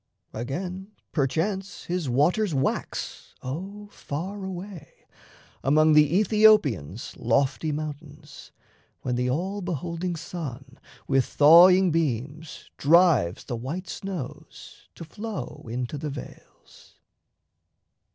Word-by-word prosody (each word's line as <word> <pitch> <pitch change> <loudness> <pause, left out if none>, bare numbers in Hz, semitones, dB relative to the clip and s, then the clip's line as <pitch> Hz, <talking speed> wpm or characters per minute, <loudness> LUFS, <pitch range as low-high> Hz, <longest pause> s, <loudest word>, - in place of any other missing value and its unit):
Again, 180 - -5 0.2
Perchance, 180 +7 -1
his 175 -5 -2
waters 165 - +2
wax, 135 - -3
O 195 +10 -6
far 190 +8 -6
away, 190 -2 -8 0.6
Among 155 +3 +4
the 150 +4 +5
Aethiopians' 200 - +3
lofty 135 +6 +1
mountains, 150 0 -8 0.5
When 125 - -1
the 125 +1 0
all 190 +9 -2
beholding 175 +1 -3
sun 135 -6 -7 0.3
with 135 -1 +3
thawing 175 +5 +7
beams 150 0 -3
Drives 150 - +4
the 120 - -4
white 150 +11 -5
snows 180 -8 -8
to 165 - -9
flow 200 - -7
into 125 +4 -4
the 150 - -4
vales. 135 -2 -12
155 Hz, 100 wpm, -26 LUFS, 135-185 Hz, 0.6 s, thawing